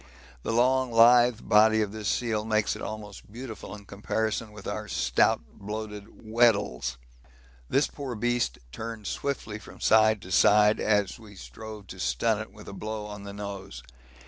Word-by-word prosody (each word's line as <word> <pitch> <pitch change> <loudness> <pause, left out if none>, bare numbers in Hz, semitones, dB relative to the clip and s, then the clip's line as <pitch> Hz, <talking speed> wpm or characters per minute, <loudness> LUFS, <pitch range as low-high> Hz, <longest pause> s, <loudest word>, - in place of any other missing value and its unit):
The - - -3
long 130 +2 +2
lithe 120 0 +6
body 110 +1 +5
of 100 - -4
this 110 -1 -5
seal 110 -2 0
makes 110 -1 +1
it - - -9
almost 105 -2 -8
beautiful 115 -2 -8
in 105 -1 -13
comparison 110 +2 -2
with 105 -2 -12
our - - -4
stout, - - +2
bloated 105 0 -6 0.2
Weddells. 105 - +2 0.7
This 140 +2 +3
poor 135 -4 -6
beast 120 - 0
turned 110 - -7
swiftly 110 -6 -3
from - - -13
side 110 -1 +4
to 95 - -10
side 105 +2 +5
as 105 0 +1
we 105 -3 -14
strove 100 - -10
to - - -10
stun 60 -1 +1
it - - -9
with - - -14
a - - -7
blow 105 +1 -5
on 105 -1 -8
the 100 - -7
nose. 100 -9 -7
105 Hz, 165 wpm, -27 LUFS, 100-115 Hz, 0.7 s, lithe